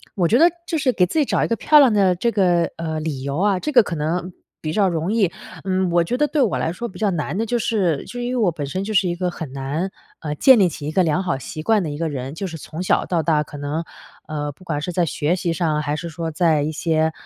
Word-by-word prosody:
我 175 Hz, -4 st, +2 dB
觉 235 Hz, -, +4 dB
得 340 Hz, +2 st, +6 dB
就 325 Hz, -, -2 dB
是 270 Hz, -3 st, +2 dB
给 185 Hz, -7 st, +3 dB
自 185 Hz, -, -4 dB
己 -, -, +4 dB
找 -, -, +1 dB
一 -, -, +1 dB
个 230 Hz, -, 0 dB
漂 300 Hz, +9 st, +5 dB
亮 260 Hz, -6 st, +6 dB
的， 190 Hz, -3 st, +3 dB
这 235 Hz, +7 st, 0 dB
个， 175 Hz, -5 st, +2 dB
呃， 160 Hz, -1 st, -3 dB
理 150 Hz, -4 st, -4 dB
由 140 Hz, +2 st, -3 dB
啊， 195 Hz, -1 st, +2 dB
这 300 Hz, -, -3 dB
个 245 Hz, -4 st, +6 dB
可 175 Hz, -, -4 dB
能 170 Hz, +4 st, -2 dB, 0.3 s
比 155 Hz, -, -3 dB
较 200 Hz, 0 st, +3 dB
容 165 Hz, +2 st, -1 dB
易。 200 Hz, -7 st, +2 dB, 0.3 s
嗯， 190 Hz, -1 st, 0 dB
我 170 Hz, 0 st, +3 dB
觉 245 Hz, +9 st, -2 dB
得 295 Hz, +2 st, +2 dB
对 300 Hz, -, 0 dB
我 230 Hz, -7 st, +2 dB
来 160 Hz, -, -1 dB
说 235 Hz, +5 st, -5 dB
比 200 Hz, -, -11 dB
较 210 Hz, -2 st, +2 dB
难 160 Hz, 0 st, -2 dB
的 225 Hz, -, 0 dB
就 240 Hz, +2 st, 0 dB
是 185 Hz, -10 st, 0 dB
就 245 Hz, -, -7 dB
因 245 Hz, +1 st, -2 dB
为 255 Hz, -, -1 dB
我 210 Hz, -7 st, +2 dB
本 150 Hz, -3 st, -5 dB
身 185 Hz, +7 st, -3 dB
就 215 Hz, +2 st, -4 dB
是 190 Hz, -2 st, +3 dB
一 175 Hz, -, -1 dB
个 180 Hz, 0 st, -1 dB
很 160 Hz, -6 st, -7 dB
难， 140 Hz, +7 st, -2 dB, 0.3 s
呃， 150 Hz, -2 st, -4 dB
建 260 Hz, -, +7 dB
立 190 Hz, -, +5 dB
起 150 Hz, -2 st, -7 dB
一 -, -, -2 dB
个 185 Hz, +3 st, +3 dB
良 165 Hz, +3 st, +1 dB
好 175 Hz, -7 st, -1 dB
习 155 Hz, +3 st, -7 dB
惯 215 Hz, +2 st, +3 dB
的 160 Hz, -, -3 dB
一 145 Hz, -, -5 dB
个 165 Hz, 0 st, -1 dB
人， 135 Hz, -1 st, -5 dB
就 195 Hz, +4 st, -4 dB
是 165 Hz, -2 st, -7 dB
从 160 Hz, +3 st, -7 dB
小 -, -, +2 dB
到 170 Hz, -3 st, 0 dB
大 155 Hz, -1 st, +2 dB
可 145 Hz, -, -10 dB
能， 145 Hz, +3 st, -3 dB, 0.4 s
呃， 150 Hz, -1 st, -3 dB
不 145 Hz, -, -18 dB
管 150 Hz, -3 st, -2 dB
是 180 Hz, -, -3 dB
在 175 Hz, 0 st, +1 dB
学 155 Hz, +1 st, 0 dB
习 175 Hz, -2 st, -1 dB
上， 155 Hz, -3 st, 0 dB
还 145 Hz, 0 st, -2 dB
是 170 Hz, +2 st, -5 dB
说 165 Hz, 0 st, -4 dB
在 155 Hz, -2 st, +2 dB
一 155 Hz, -, -1 dB
些， 160 Hz, 0 st, +1 dB
170 Hz, 315 characters per minute, -21 LUFS, 155-200 Hz, 0.4 s, 建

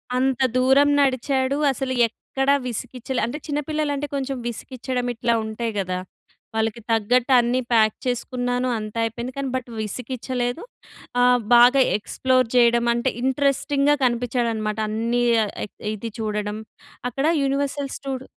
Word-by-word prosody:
అంత 260 Hz, 0 st, +1 dB, 0.2 s
దూరం 265 Hz, +3 st, +5 dB
నడిచాడు. 265 Hz, 0 st, +1 dB
అసలు 265 Hz, 0 st, -3 dB
ఎక్కడ 270 Hz, +4 st, -3 dB, 0.2 s
విసిగిచ్చలే. 250 Hz, +1 st, -4 dB
అంటే 240 Hz, +6 st, -4 dB
చిన్న 295 Hz, 0 st, -1 dB
పిల్లలంటే 295 Hz, -2 st, -1 dB
కొంచెం 270 Hz, -1 st, -2 dB
విసిగిచ్చడం 250 Hz, +1 st, -4 dB
ఇట్లా 235 Hz, +1 st, +1 dB
ఉంటాయి 220 Hz, +1 st, -3 dB
గదా! 185 Hz, -1 st, -2 dB, 0.6 s
వాళ్ళకి 225 Hz, +1 st, -1 dB
తగ్గట్టు 235 Hz, +4 st, +2 dB
అన్నీ 240 Hz, +2 st, +1 dB
ప్యాక్ 215 Hz, -2 st, +4 dB
చేసుకున్నాను. 245 Hz, 0 st, -1 dB
అంతా 215 Hz, +1 st, -5 dB
అయిపోయింది 235 Hz, +3 st, -4 dB
కానీ 275 Hz, -1 st, -2 dB
బట్ 255 Hz, -1 st, -4 dB
విసిగించలేదు. 245 Hz, -, -3 dB, 0.6 s
ఆ! -, -, +5 dB, 0.3 s
బాగా 245 Hz, +3 st, +7 dB, 0.2 s
ఎక్స్‌ప్లోర్ 255 Hz, +3 st, +1 dB
చేయడం 235 Hz, -1 st, +4 dB
అంటే 235 Hz, +2 st, 0 dB
ఇంట్రెస్టింగ్‍గా 280 Hz, +2 st, +2 dB
కనిపిచ్చాడనమాట 235 Hz, -3 st, -1 dB
అన్నీ 230 Hz, +3 st, 0 dB, 0.2 s
ఆహ్, 205 Hz, -, -5 dB, 0.4 s
ఇది 230 Hz, +3 st, -6 dB
చూడడం 210 Hz, -1 st, -2 dB, 0.5 s
అక్కడ 270 Hz, +4 st, -2 dB, 0.2 s
యూనివర్సల్ 275 Hz, 0 st, -1 dB
స్టూడ్ 265 Hz, -1 st, -5 dB
250 Hz, 125 wpm, -23 LUFS, 230-265 Hz, 0.6 s, బాగా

